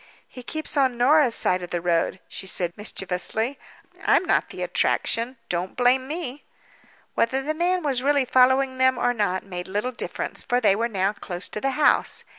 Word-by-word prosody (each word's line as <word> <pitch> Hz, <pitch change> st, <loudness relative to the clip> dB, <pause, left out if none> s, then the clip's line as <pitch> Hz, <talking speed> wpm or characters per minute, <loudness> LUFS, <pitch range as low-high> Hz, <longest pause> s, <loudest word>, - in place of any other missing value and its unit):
"He 250 Hz, -, -11 dB
keeps 310 Hz, +6 st, -5 dB
on 260 Hz, -3 st, +2 dB
Norah's 260 Hz, 0 st, +4 dB
side 180 Hz, 0 st, +3 dB
of 175 Hz, -, -6 dB
the 175 Hz, -, -2 dB
road," 170 Hz, +2 st, 0 dB
she 190 Hz, -, -8 dB
said, 175 Hz, -2 st, -1 dB
mischievously. 210 Hz, +5 st, -3 dB, 0.4 s
"I'm -, -, +3 dB
not -, -, +1 dB
the -, -, -6 dB
attraction—don't 230 Hz, -7 st, -1 dB
blame 255 Hz, +1 st, +3 dB
me." 295 Hz, -3 st, -5 dB, 0.7 s
Whether 265 Hz, +4 st, +1 dB
the 305 Hz, +3 st, -1 dB
man 355 Hz, +2 st, 0 dB
was 270 Hz, -4 st, 0 dB
really 280 Hz, 0 st, +2 dB
following 260 Hz, +1 st, +3 dB
them, 260 Hz, 0 st, +4 dB
or 245 Hz, -, +1 dB
not, 205 Hz, -5 st, -1 dB
made 180 Hz, -2 st, -6 dB
little 205 Hz, +6 st, -2 dB
difference, 245 Hz, -, -5 dB
for 245 Hz, -1 st, +1 dB
they 205 Hz, -5 st, +4 dB
were 230 Hz, +3 st, -1 dB
now 195 Hz, -1 st, 0 dB
close 180 Hz, -3 st, -6 dB
to 210 Hz, -, -5 dB
the 270 Hz, -, +1 dB
house. 300 Hz, -, +2 dB
245 Hz, 180 wpm, -24 LUFS, 195-265 Hz, 0.7 s, Norah's